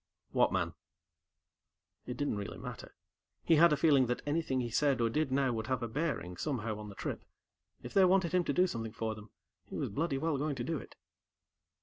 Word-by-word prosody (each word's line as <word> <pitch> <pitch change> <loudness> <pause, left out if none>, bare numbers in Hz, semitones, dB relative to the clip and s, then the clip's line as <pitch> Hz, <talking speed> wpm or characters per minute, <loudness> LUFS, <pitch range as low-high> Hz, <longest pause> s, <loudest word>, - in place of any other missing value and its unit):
"What - - +3
man?" - - 0 1.3
It 125 - -4
didn't 145 -7 -1
really 100 -1 -5
matter. - - -8 0.5
He 165 - +4
had 170 +1 +7
a 150 - +3
feeling 140 -4 +4
that 125 - -2
anything 145 -3 0
he 120 -2 -2
said 140 +1 +2
or 115 -1 +2
did 150 +1 0
now 135 -2 +2
would 110 -1 -3
have 130 -3 -1
a - - -1
bearing, 115 - -2
somehow, 115 - -2
on 105 -1 -7
the 100 - -10
trip. - - -4 0.6
If 120 - -8
they 195 -1 +6
wanted 185 -2 +3
him 180 0 +3
to - - 0
do 180 - +4
something 115 -10 -4
for 110 -1 -2
them, 105 0 -11 0.4
he - - -6
was - - -1
bloody 145 +6 -1
well 150 0 0
going 145 0 -1
to 120 - -3
do 160 +3 -2
it. - - -12
135 Hz, 215 wpm, -33 LUFS, 115-155 Hz, 1.3 s, had